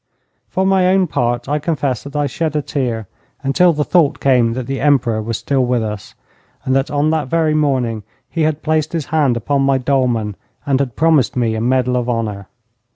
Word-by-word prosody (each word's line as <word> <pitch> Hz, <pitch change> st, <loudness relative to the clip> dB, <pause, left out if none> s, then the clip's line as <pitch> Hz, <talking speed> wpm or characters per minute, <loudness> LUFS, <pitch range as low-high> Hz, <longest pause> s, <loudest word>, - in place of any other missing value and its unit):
For 190 Hz, -, 0 dB
my 190 Hz, -1 st, +3 dB
own 190 Hz, 0 st, +3 dB
part, 120 Hz, -6 st, -1 dB
I 150 Hz, +2 st, 0 dB
confess 140 Hz, -6 st, -1 dB
that 140 Hz, -, -9 dB
I 145 Hz, 0 st, +1 dB
shed 155 Hz, +3 st, -2 dB
a 150 Hz, -, 0 dB
tear 120 Hz, -8 st, -3 dB, 0.4 s
until 155 Hz, +6 st, +4 dB
the 150 Hz, -2 st, 0 dB
thought 155 Hz, -3 st, +2 dB
came 125 Hz, -4 st, +3 dB
that 125 Hz, 0 st, -4 dB
the 135 Hz, +1 st, -4 dB
Emperor 130 Hz, -6 st, +2 dB
was 115 Hz, +1 st, -3 dB
still 135 Hz, -2 st, 0 dB
with 125 Hz, -2 st, 0 dB
us, 105 Hz, -2 st, -6 dB, 0.5 s
and 130 Hz, -, +1 dB
that 135 Hz, +1 st, +1 dB
on 145 Hz, +1 st, +1 dB
that 155 Hz, -3 st, -1 dB
very 160 Hz, +1 st, +1 dB
morning 130 Hz, -7 st, 0 dB, 0.3 s
he 165 Hz, -, -3 dB
had 155 Hz, 0 st, 0 dB
placed 155 Hz, 0 st, 0 dB
his 165 Hz, -4 st, -2 dB
hand 140 Hz, -6 st, +2 dB
upon 140 Hz, +5 st, 0 dB
my 135 Hz, 0 st, +3 dB
dolman 125 Hz, -6 st, 0 dB, 0.3 s
and 135 Hz, -2 st, +1 dB
had 130 Hz, -4 st, -2 dB
promised 155 Hz, -5 st, +2 dB
me 120 Hz, -3 st, 0 dB
a 110 Hz, -, -2 dB
medal 125 Hz, +1 st, +1 dB
of 125 Hz, 0 st, -2 dB
honour. 105 Hz, -4 st, -3 dB
135 Hz, 205 wpm, -17 LUFS, 120-150 Hz, 0.5 s, until